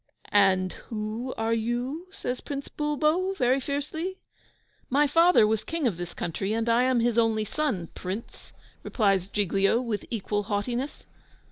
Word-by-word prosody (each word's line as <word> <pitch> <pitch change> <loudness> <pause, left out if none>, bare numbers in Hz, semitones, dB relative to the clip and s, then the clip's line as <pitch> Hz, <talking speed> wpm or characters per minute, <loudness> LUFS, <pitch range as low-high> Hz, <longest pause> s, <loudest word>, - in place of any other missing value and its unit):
"And 190 -2 +4 0.2
who 220 +3 -3
are 225 +1 +1
you?" 245 +9 -2
says 255 -10 -4
Prince 280 -1 -5
Bulbo, 305 +6 +1
very 255 -3 +2
fiercely. 305 +7 -3 0.7
"My 285 +3 +4
father 330 -3 +5
was 215 0 +1
King 330 -3 -2
of 210 -9 +1
this 175 -1 -6
country, 195 +5 -2
and 225 +1 -1
I 230 +1 +4
am 255 -2 +3
his 235 0 +2
only 220 -2 +2
son, 210 - -2
Prince!" 190 +5 -7 0.3
replies 195 -5 +1
Giglio, 200 +2 +2
with 230 -4 -3
equal 210 -2 -1
haughtiness. 240 +7 -2
235 Hz, 145 wpm, -27 LUFS, 205-285 Hz, 0.7 s, father